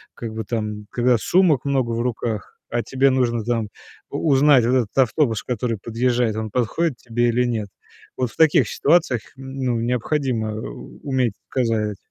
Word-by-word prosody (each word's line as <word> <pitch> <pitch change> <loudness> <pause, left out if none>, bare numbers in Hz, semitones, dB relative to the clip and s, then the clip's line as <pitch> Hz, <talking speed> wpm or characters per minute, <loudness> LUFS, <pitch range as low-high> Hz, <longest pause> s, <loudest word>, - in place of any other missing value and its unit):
как 115 -2 -6
бы, 110 0 -4
там, 105 -2 -4
когда 120 0 +2
сумок 170 - +3
много 130 -4 +1
в 115 0 -1
руках, 115 -3 -3 0.2
а 120 - 0
тебе 135 +2 +2
нужно, 120 -3 +1
там, 115 -3 -1 0.4
у 160 - -1
узнать 135 -3 +5
вот 125 - +2
этот 120 -3 -1
автобус, 125 -3 +2
который 120 -1 -2
подъезжает, 120 +1 0
он 110 0 -3
подходит 125 +6 0
тебе 120 0 0
или 125 +2 +2
нет. 110 -4 -2 0.5
Вот 125 -3 -1
в - - -19
таких 160 -2 +4
ситуациях, 145 -7 +2
ну, 130 -3 -3
необходимо 120 -2 -1
у 110 - -8
уметь 130 -5 +1 0.2
показать. 110 -5 0
120 Hz, 165 wpm, -22 LUFS, 115-130 Hz, 0.5 s, узнать